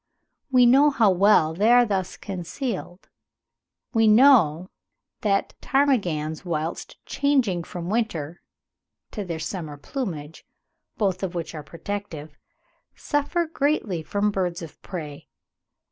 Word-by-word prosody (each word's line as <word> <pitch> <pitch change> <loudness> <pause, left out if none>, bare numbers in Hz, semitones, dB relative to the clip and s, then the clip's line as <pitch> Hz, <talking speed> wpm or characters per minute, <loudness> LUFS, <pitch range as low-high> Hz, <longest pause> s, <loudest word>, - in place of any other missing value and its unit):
We 250 -1 +6
know 275 +5 +6
how 225 -8 +3
well 185 -4 +4
they 210 +7 +2
are 245 0 +6
thus 195 -4 -2
concealed; 190 - -6 0.9
we 225 -2 +4
know 210 - +5 0.5
that 200 -2 0
ptarmigans, 180 - 0
whilst 165 -2 -4
changing 245 - 0
from 175 -2 -7
their 180 - -4
winter 175 -8 -2 0.7
to 210 - -4
their 170 -4 -4
summer 160 -3 -5
plumage, 160 - -6 0.5
both 190 -3 0
of 190 -2 -4
which 170 -1 -4
are 155 - -6
protective, 160 -2 -7 0.6
suffer 295 +4 -1
greatly 285 - -1
from 205 +5 -1
birds 180 -3 -2
of 160 - -12
prey. 150 -6 -8
190 Hz, 120 wpm, -24 LUFS, 165-235 Hz, 0.9 s, We